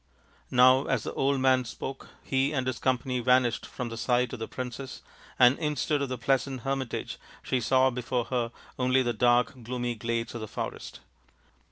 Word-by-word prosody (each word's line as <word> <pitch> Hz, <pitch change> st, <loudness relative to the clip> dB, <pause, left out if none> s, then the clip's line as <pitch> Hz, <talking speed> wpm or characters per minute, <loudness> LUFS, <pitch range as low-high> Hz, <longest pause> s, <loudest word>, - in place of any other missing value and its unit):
Now 130 Hz, +2 st, +5 dB
as 125 Hz, -5 st, 0 dB
the -, -, -5 dB
old 135 Hz, 0 st, +1 dB
man 130 Hz, -1 st, +4 dB
spoke 135 Hz, +3 st, -7 dB, 0.2 s
he 135 Hz, +2 st, 0 dB
and 130 Hz, -3 st, -1 dB
his 130 Hz, -2 st, -2 dB
company 130 Hz, -1 st, 0 dB
vanished 125 Hz, -1 st, +2 dB
from 125 Hz, -2 st, -5 dB
the 115 Hz, -, -6 dB
sight 125 Hz, +1 st, +1 dB
of 125 Hz, -, -5 dB
the 110 Hz, -, -4 dB
princess 130 Hz, +1 st, -6 dB, 0.3 s
and 125 Hz, +2 st, +6 dB
instead 150 Hz, -1 st, 0 dB
of 140 Hz, -, -2 dB
the 130 Hz, -, -3 dB
pleasant 130 Hz, +1 st, 0 dB
hermitage 135 Hz, -1 st, -3 dB, 0.2 s
she 130 Hz, -, 0 dB
saw 130 Hz, +3 st, +3 dB
before 125 Hz, 0 st, -2 dB
her 120 Hz, -3 st, -1 dB, 0.3 s
only 130 Hz, +1 st, +3 dB
the 120 Hz, -1 st, 0 dB
dark 120 Hz, +2 st, +2 dB
gloomy 120 Hz, +1 st, -3 dB
glades 115 Hz, +1 st, -3 dB
of 120 Hz, -, -6 dB
the 110 Hz, -, -5 dB
forest. -, -, -6 dB
125 Hz, 180 wpm, -28 LUFS, 120-130 Hz, 0.3 s, and